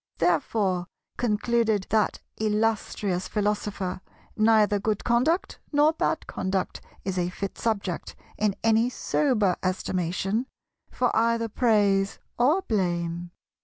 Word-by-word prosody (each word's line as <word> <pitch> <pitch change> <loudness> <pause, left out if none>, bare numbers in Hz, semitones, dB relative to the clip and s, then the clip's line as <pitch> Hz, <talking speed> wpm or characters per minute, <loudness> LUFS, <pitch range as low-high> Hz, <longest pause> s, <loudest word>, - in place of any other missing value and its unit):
Therefore, 180 +2 +1 0.3
concluded 225 -2 +1
that 215 -1 +1 0.2
illustrious 210 -3 0
Philosopher, 205 -3 -2 0.3
neither 215 -2 +4
good 210 0 -1
conduct 255 +10 +1
nor 300 +1 +4
bad - - -1
conduct 190 0 -2 0.2
is 190 -1 -1
a 175 0 0
fit 195 +2 -5
subject, 200 -6 -2 0.2
in 210 -2 +1
any 225 +2 +4
sober 240 - +1
estimation, 185 +5 -1 0.4
for 250 - 0
either 230 0 +2
praise 205 -4 +2 0.2
or 300 +10 +3
blame. 175 - -1
210 Hz, 105 wpm, -26 LUFS, 185-230 Hz, 0.4 s, neither